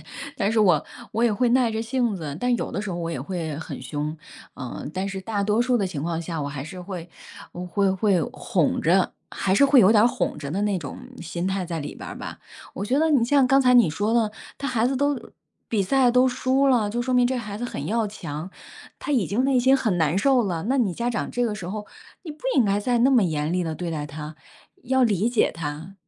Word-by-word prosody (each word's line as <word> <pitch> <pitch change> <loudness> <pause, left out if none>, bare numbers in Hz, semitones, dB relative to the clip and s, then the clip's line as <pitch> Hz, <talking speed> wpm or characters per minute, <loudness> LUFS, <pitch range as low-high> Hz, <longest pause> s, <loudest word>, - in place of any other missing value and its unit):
她 - - -8 0.2
但 210 0 0
是 225 - +3
我 180 -8 +4 0.3
我 230 +2 +1
也 230 - +3
会 245 +4 +2
耐 245 -1 +3
着 220 0 -2
性 235 -1 0
子， 155 -6 -5
但 245 +4 +1
有 - - -4
的 200 - -3
时 205 - -4
候 175 - -3
我 170 -1 -3
也 160 - -4
会 160 -1 -4
很 160 - -7
凶， 150 +1 -4 0.4
嗯。 130 +2 -6
但 190 +2 -2
是 195 -1 -5
大 205 +1 -2
多 210 +3 +1
数 245 0 +2
的 195 - 0
情 155 -6 -5
况 165 0 -2
下， 165 -2 -4
我 140 - -3
还 140 -2 -5
是 170 +5 -8
会 180 -2 -7 0.4
我 180 +1 -6
会 195 +2 +1
会 190 -2 +2
哄 170 -6 0
着， 180 +4 +3 0.2
还 190 - 0
是 280 - +5
会 275 -2 +6
有 195 0 +6
点 215 -1 +6
儿 - - +7
哄 245 - -1
着 145 -2 -6
的 185 +6 -1
那 205 -3 +1
种 145 -4 -7 0.2
心 170 +2 -4
态 190 -1 -1
在 165 -2 -4
里 145 - -6
边 - - -9
儿 - - -7
吧， - - -7 0.4
我 200 - -4
觉 255 +6 +1
得 320 +1 +3
你 270 -6 +4
像 270 +1 +4
刚 270 +1 +4
才 250 -2 +4
你 240 -9 +6
说 205 +8 -1
的， 230 -3 +2 0.3
他 280 - -3
孩 235 -2 +1
子 265 - 0
都 285 0 +1 0.5
比 210 -4 0
赛 255 +5 +3
都 250 +2 +4
输 260 +2 +1
了， 235 -6 +3
就 240 - -2
说 255 +1 -1
明 245 -1 +5
这 260 - -1
孩 210 -3 -6
子 240 - -4
很 145 - -5
要 225 +4 0
强， 170 -4 -6 0.5
他 295 - -3
已 240 -9 +2
经 235 +6 0
内 270 -2 +3
心 260 +2 +5
很 215 -8 0
难 160 +2 +2
受 260 +3 +3
了， 175 -5 -2
那 265 +5 +1
你 225 -8 +1
家 235 +7 -2
长 230 - -2
这 245 - -1
个 215 - -2
时 190 -4 -7
候 210 +3 -5 0.4
你 330 - -7
不 300 - -12
应 250 -5 +4
该 200 0 +2
再 240 +3 +1
那 250 +3 +4
么 250 -5 +5
严 155 -4 -1
厉 180 +1 0
地 160 -2 -3
对 170 +1 -4
待 150 -2 -3
他， 150 +1 -8 0.5
要 260 +1 +2
理 210 -1 +2
解 240 -2 +2
他 160 +3 -6
205 Hz, 275 characters per minute, -24 LUFS, 170-245 Hz, 0.5 s, 儿